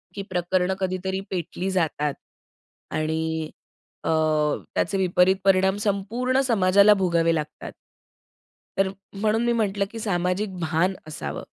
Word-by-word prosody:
की 200 - -4
प्रकरणं 180 +1 0
कधीतरी 190 0 -2
पेटली 180 +1 -3
जातात 150 -5 0 0.8
आणि 160 0 -1 0.5
अ, - - -2 0.7
त्याचे 200 - +1
विपरीत 185 0 +3
परिणाम 190 0 +3
संपूर्ण 230 +6 0
समाजाला 200 -2 +5
भोगावे 170 -4 +2
लागतात. 150 -1 -5 1.1
तर 195 0 +3 0.3
म्हणून 215 +3 +1
मी 240 - +2
म्हटलं, 205 -3 0
की 225 - -7
सामाजिक 185 -1 -1
भान 170 +3 +1
असावं. 70 - -5
190 Hz, 115 wpm, -24 LUFS, 170-200 Hz, 1.1 s, समाजाला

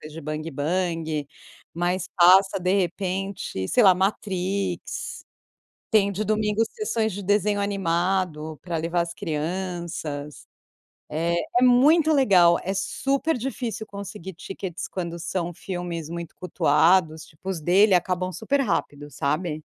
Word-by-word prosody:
coisas 155 0 -10
de 165 - -8
bang 155 +2 -4
bang, 160 0 -1 0.5
mas 175 +2 -1
passa 190 +3 +6
de 180 +1 0
repente 185 - -2
sei 245 - +4
lá, 185 -2 +8
Matrix. 190 -1 -2 0.7
Tem 200 -2 +3
de 210 +3 -2
domingo 215 +1 +1
sessões 225 - -2
de 200 +2 -5
desenho 205 +1 +1
animado 175 -5 -1
pra 175 -2 -3
levar 165 +2 0
as 170 0 -2
crianças, 160 -3 -4 0.6
é 170 +3 -1 0.3
é - - 0
muito 295 +6 +5
legal, 185 - +5
é 190 - -2
super 275 +9 -1
difícil 240 -3 -4
conseguir 200 -2 -8
tickets 190 0 -6
quando 170 -2 -5
são 175 0 -3
filmes 175 -3 -5
muito 170 -1 -6
cultuados, 160 -1 +2
tipo 165 +4 -12
os 175 -4 -3
dele 190 +6 +4
acabam 185 +1 0
super 275 +8 0
rápido 145 - -2
sabe. 150 +3 -2
180 Hz, 130 wpm, -24 LUFS, 165-200 Hz, 0.7 s, lá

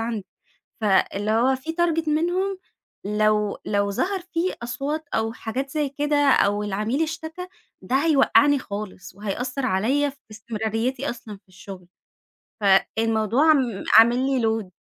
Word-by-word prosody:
عندي، 225 -4 -4 0.6
فاللي 205 +1 +1
هو 245 +4 +3
في 315 +5 -6
target 330 -2 +1
منهم 355 +5 0 0.5
لو 210 0 +1
لو 200 -1 0
ظهر 380 - -1
فيه 340 +3 0
أصوات 280 +6 -4
أو 225 0 0
حاجات 255 +4 -4
زي 295 -1 -1
كده 290 +2 -1 0.2
أو 205 -2 +2
العميل 215 +8 -1
اشتكى، 325 +3 -6 0.3
ده 255 - -2
هيوقعني 285 -1 +4
خالص 200 -5 -8
وهيأثر 245 +6 -3
عليّا 255 +8 +1
في 280 - -14
استمراريتي 225 +5 -3
أصلًا 230 -3 -8
في - - -36
الشغل. 185 -1 -11 0.7
فالموضوع 220 +7 +2
عم 255 -9 +2
عامل 230 +2 +7
لّي 265 -2 +1
load 220 -3 -1
235 Hz, 135 wpm, -23 LUFS, 210-290 Hz, 0.7 s, عامل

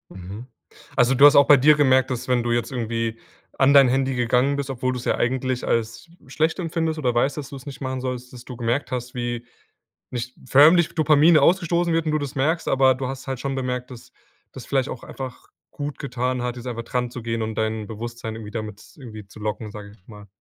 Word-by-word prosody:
Mhm. 100 +7 -9 0.5
Also, 125 0 +4
du 140 +3 +5
hast 145 0 +7
auch 140 - +7
bei 145 - +8
dir 150 +3 +5
gemerkt, 130 -3 +3
dass 125 0 -4
wenn 125 -1 +2
du 120 0 -1
jetzt 120 +3 -1
irgendwie 115 -1 -3 0.4
an 140 +1 +4
dein 135 -2 +7
Handy 135 +1 +1
gegangen 125 +3 +1
bist, 140 -1 -4
obwohl 130 0 -2
du 125 - -4
es 125 - -8
ja - - +1
eigentlich 130 0 -1
als 115 +8 -2 0.2
schlecht 155 +6 -1
empfindest 165 -2 -2
oder 125 -5 0
weißt, 135 +5 +1
dass 150 - -6
du 140 - -8
es 130 - -12
nicht 140 - -8
machen 130 -1 -3
sollst, 125 -1 -5
dass 125 -1 -11
du 125 - -9
gemerkt 120 +4 -1
hast, 125 0 -4
wie 120 -1 -4 0.7
nicht 125 0 -5
förmlich 155 +6 +6
Dopamine 155 0 +5
ausgestoßen 170 +1 +2
wird 165 0 +1
und 155 - 0
du 155 - +1
das 145 -1 -5
merkst. 160 +6 0
Aber 130 -1 +4
du 130 +1 -4
hast 135 +1 -7
halt 135 -2 -3
schon 135 0 -3
bemerkt, 125 -1 -3
dass 120 -2 -12 0.4
das - - -10
vielleicht 135 -1 0
auch 120 - -7
einfach 130 -2 -8 0.2
gut 145 -2 -6
getan 125 -2 -2
hat, 125 0 -3
jetzt 125 0 -8
einfach 115 -1 -4
dran 125 0 -2
zu 125 - -7
gehen 115 0 -3
und 110 0 -3
dein 110 0 -2
Bewusstsein 115 0 -6
irgendwie 105 -2 -8
damit 110 -2 -6
z - - -18
irgendwie 110 -6 -10
zu 105 - -14
locken, 105 0 -4
sage 105 -1 -9
ich 105 - -19
jetzt 90 - -35
mal. 105 -2 -13
125 Hz, 235 wpm, -23 LUFS, 120-140 Hz, 0.7 s, bei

